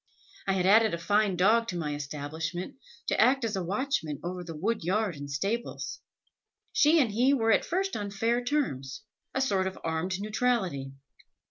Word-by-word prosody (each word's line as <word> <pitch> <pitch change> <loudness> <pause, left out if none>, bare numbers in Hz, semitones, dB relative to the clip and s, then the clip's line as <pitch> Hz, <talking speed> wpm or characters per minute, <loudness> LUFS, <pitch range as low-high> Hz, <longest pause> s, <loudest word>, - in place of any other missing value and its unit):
I 195 - +3
had 185 -1 +1
added 215 0 +5
a - - -5
fine 205 +3 +2
dog 220 +6 +4
to 180 - -3
my 150 -3 -2
establishment, 150 +4 -4 0.4
to - - +2
act 260 -1 +4
as 220 -2 -2
a 190 - -1
watchman 190 - -1
over 180 +1 -4
the 165 -2 -7
wood 210 +6 -1
yard 195 +1 0
and 145 0 -7
stables. 200 - -3 0.7
She 310 +3 +5
and 245 -7 +2
he 250 +6 +3
were 225 -3 +2
at - - +4
first 385 +2 -1
on 205 -1 -3
fair 230 +5 0
terms, 140 - -2 0.3
a 265 - +1
sort 195 -8 +1
of 190 - -5
armed 165 +3 -1
neutrality. 205 - -1
195 Hz, 175 wpm, -29 LUFS, 165-230 Hz, 0.7 s, added